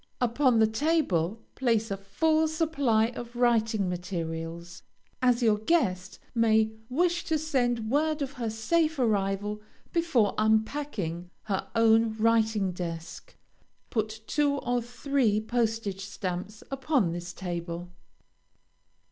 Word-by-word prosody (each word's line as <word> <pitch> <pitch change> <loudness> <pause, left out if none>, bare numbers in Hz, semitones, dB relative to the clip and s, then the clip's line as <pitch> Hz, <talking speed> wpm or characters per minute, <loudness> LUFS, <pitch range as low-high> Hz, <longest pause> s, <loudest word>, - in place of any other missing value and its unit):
Upon 250 +1 +3
the 220 - +6
table, 220 - 0
place 230 -4 +1
a - - 0
full 315 +11 +1
supply 285 -9 +1
of 240 0 -8
writing 225 -4 +2
materials, 170 -1 -5 0.4
as 250 -1 +3
your 215 -2 +3
guest 200 - 0 0.2
may 220 -2 +3 0.2
wish 345 +6 +1
to 320 - +1
send 245 -7 0
word 305 +1 +1
of 270 - -4
her 240 -4 -3
safe 310 +9 +1
arrival 205 -3 0 0.3
before 320 - +2
unpacking 215 - 0
her 195 -3 -2
own 225 -1 +4
writing 220 -3 +2
desk. 170 -1 -7 0.6
Put 220 -1 -2
two 290 +2 +1
or 245 -3 -1
three 245 -2 0
postage 220 -3 -1
stamps 195 +1 -5
upon 270 - +1
this 175 0 -5
table. 175 -1 -5
225 Hz, 115 wpm, -28 LUFS, 195-260 Hz, 0.6 s, the